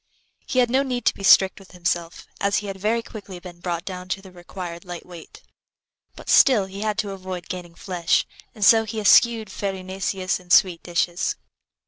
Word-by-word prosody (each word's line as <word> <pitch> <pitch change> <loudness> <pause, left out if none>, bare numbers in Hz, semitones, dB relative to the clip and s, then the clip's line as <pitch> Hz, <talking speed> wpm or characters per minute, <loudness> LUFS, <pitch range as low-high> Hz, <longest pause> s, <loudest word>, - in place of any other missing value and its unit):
He - - -3
had 245 -2 +3
no 265 +2 +3
need 250 -3 -3
to - - +4
be - - -12
strict 190 0 +5
with 190 -1 -17
himself, 175 -1 -3
as 200 0 +1
he 210 - -3
had 195 -1 -6
very 225 +4 0
quickly 200 -5 -10
been 175 -1 -12
brought 175 -1 -4
down 185 -1 -7
to 195 - -2
the 190 - -13
required 175 -1 -8
light 175 -2 -8
weight; 175 -3 -13 0.7
but - - -13
still 240 -8 +5
he 195 +1 -8
had 215 -1 -1
to 205 -2 -2
avoid 185 -2 -7
gaining 175 -2 -7
flesh, 175 -2 0 0.3
and 210 -3 0
so 225 +1 +7
he 220 0 -5
eschewed 220 0 +4
farinaceous 190 -1 -3
and 180 -1 -14
sweet 180 -3 +5
dishes. 175 0 -1
190 Hz, 190 wpm, -23 LUFS, 180-210 Hz, 0.7 s, so